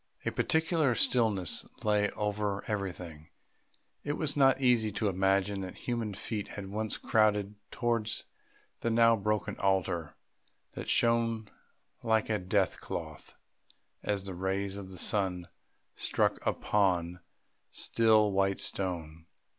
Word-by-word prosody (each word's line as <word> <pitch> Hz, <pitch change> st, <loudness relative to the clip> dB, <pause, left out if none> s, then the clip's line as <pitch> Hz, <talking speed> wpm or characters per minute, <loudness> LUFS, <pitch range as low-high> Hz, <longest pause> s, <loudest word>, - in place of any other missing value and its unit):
A -, -, +1 dB
peculiar 160 Hz, -5 st, +1 dB
stillness 110 Hz, -10 st, +1 dB, 0.2 s
lay 105 Hz, -1 st, +2 dB
over 105 Hz, -1 st, -1 dB
everything; 90 Hz, -7 st, -5 dB, 0.7 s
it 145 Hz, -, -1 dB
was 150 Hz, -1 st, 0 dB
not 135 Hz, -2 st, +5 dB
easy 120 Hz, -5 st, +3 dB
to 105 Hz, -1 st, 0 dB
imagine 95 Hz, +1 st, +1 dB
that 95 Hz, -1 st, -6 dB
human 115 Hz, -4 st, -2 dB
feet 105 Hz, +1 st, -4 dB
had 100 Hz, -1 st, -7 dB
once 110 Hz, +1 st, -2 dB
crowded 105 Hz, -2 st, +2 dB, 0.2 s
towards 115 Hz, -2 st, -1 dB, 0.6 s
the 115 Hz, -, -1 dB
now 115 Hz, 0 st, +5 dB
broken 105 Hz, 0 st, -1 dB
altar 90 Hz, -5 st, 0 dB, 0.6 s
that -, -, -6 dB
shone 115 Hz, -2 st, +2 dB, 0.5 s
like 110 Hz, -1 st, +1 dB
a 105 Hz, -, +1 dB
death 95 Hz, +1 st, 0 dB
cloth -, -, -7 dB, 0.7 s
as 100 Hz, -2 st, -1 dB
the 95 Hz, -1 st, -5 dB
rays 95 Hz, +2 st, -2 dB
of 100 Hz, -2 st, -7 dB
the 95 Hz, -, -9 dB
sun 90 Hz, -2 st, 0 dB, 0.5 s
struck -, -, 0 dB
upon 90 Hz, -4 st, +1 dB
the 90 Hz, -, -15 dB, 0.5 s
still 110 Hz, -2 st, +3 dB
white 95 Hz, 0 st, +1 dB
stone. 85 Hz, -4 st, -3 dB
105 Hz, 125 wpm, -30 LUFS, 95-110 Hz, 0.7 s, not